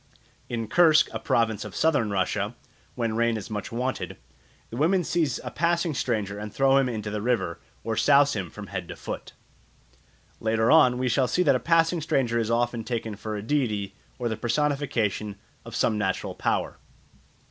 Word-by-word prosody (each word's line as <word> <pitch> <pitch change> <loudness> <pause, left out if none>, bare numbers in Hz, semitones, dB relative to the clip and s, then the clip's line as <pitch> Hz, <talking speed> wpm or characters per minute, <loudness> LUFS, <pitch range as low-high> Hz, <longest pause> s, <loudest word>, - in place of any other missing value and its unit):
In 115 -2 -3
Kursk, 160 +5 +5
a - - -3
province 110 -3 +1
of 105 -2 -9
Southern 145 -9 +2
Russia, 95 -2 -1 0.4
when 115 -3 -1
rain 115 0 +2
is 105 0 -8
much 105 -1 -4
wanted, 125 +3 -3 0.5
the - - -6
women 175 +6 +3
seize 155 -7 0
a 125 - -5
passing 170 +1 +1
stranger 105 -6 -2
and 105 0 -6
throw 135 +2 +3
him 135 -2 +3
into 110 -3 -4
the 105 0 -3
river, 105 -8 0 0.2
or 115 -1 -2
souse 145 +3 +5
him 95 -5 -3
from 105 +5 -9
head 95 -3 -5
to - - -7
foot. - - -7 1.1
Later 110 +1 +2
on 145 -6 +6
we 130 0 0
shall 125 +2 +2
see 180 - +2
that 140 -5 +4
a - - +1
passing 165 +1 +2
stranger 125 -6 +1
is 115 -1 -1
often 120 0 0
taken 115 -2 -3
for 110 +1 -5
a 105 - -5
deity 110 -7 -1 0.2
or 125 - -2
the 110 - -1
personification 115 -5 -1 0.3
of 115 -1 -8
some 110 -2 +1
natural 95 -2 -1
power. - - -1
115 Hz, 180 wpm, -26 LUFS, 105-140 Hz, 1.1 s, on